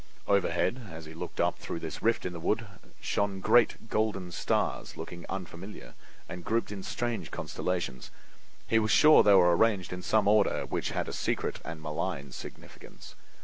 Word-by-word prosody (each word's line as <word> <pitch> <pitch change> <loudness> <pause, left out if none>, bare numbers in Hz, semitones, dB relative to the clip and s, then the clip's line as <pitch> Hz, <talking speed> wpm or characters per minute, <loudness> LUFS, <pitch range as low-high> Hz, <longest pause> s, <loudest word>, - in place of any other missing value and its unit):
Overhead, 125 -2 +1
as 80 -1 -9
he 80 - -10
looked 80 - -7
up - - +1
through - - -5
this - - -6
rift 115 +1 +1
in 90 - -3
the 85 - -6
wood, 110 +7 0 0.4
shone 100 -1 -1
great 115 +2 +3
golden 105 -5 -1
stars - - -1
looking 85 -1 -8
unfamiliar 90 - -7 0.3
and 90 0 -7
grouped 115 +2 0
in 100 -2 -5
strange 120 +4 -3
constellations. 85 -9 -3 0.6
He 115 - +3
was 110 0 0
sure 155 +7 +7
they 100 -1 +6
were 90 -2 +6
arranged 100 -3 +2
in 90 - -5
some 105 +2 +2
order 105 -1 +3
which - - -2
had - - -2
a - - -5
secret - - -2
and 80 -1 -6
malign 70 -3 -3
significance. - - -11
95 Hz, 170 wpm, -29 LUFS, 85-110 Hz, 0.6 s, sure